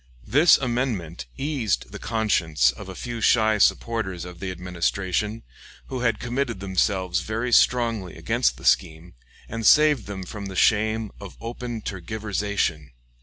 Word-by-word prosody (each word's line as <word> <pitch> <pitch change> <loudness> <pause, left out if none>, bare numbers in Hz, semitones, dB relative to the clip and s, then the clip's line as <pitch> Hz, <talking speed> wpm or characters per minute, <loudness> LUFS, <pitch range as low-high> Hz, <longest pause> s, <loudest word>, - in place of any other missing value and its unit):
This 155 +6 +6
amendment 115 - -2
eased 135 -8 -1
the - - -8
conscience 85 - +1
of 60 +9 -10
a 95 - -7
few 120 +1 -5
shy 110 -1 +3
supporters 95 -5 +1
of 90 -1 -10
the 95 - -4
Administration 95 +4 -2 0.5
who 130 - -3
had 115 -3 +1
committed 120 -3 -2
themselves 95 -1 0
very 115 +6 -3
strongly 115 -6 +2
against - - 0
the - - -12
scheme, 80 +3 +1 0.3
and 115 0 -5
saved 150 -2 +5
them 100 -2 -5
from 100 +1 -7
the 95 - -7
shame 110 +1 +2
of 100 -3 -10
open 120 0 -5
tergiversation. 100 -5 -2
105 Hz, 140 wpm, -24 LUFS, 90-115 Hz, 0.5 s, This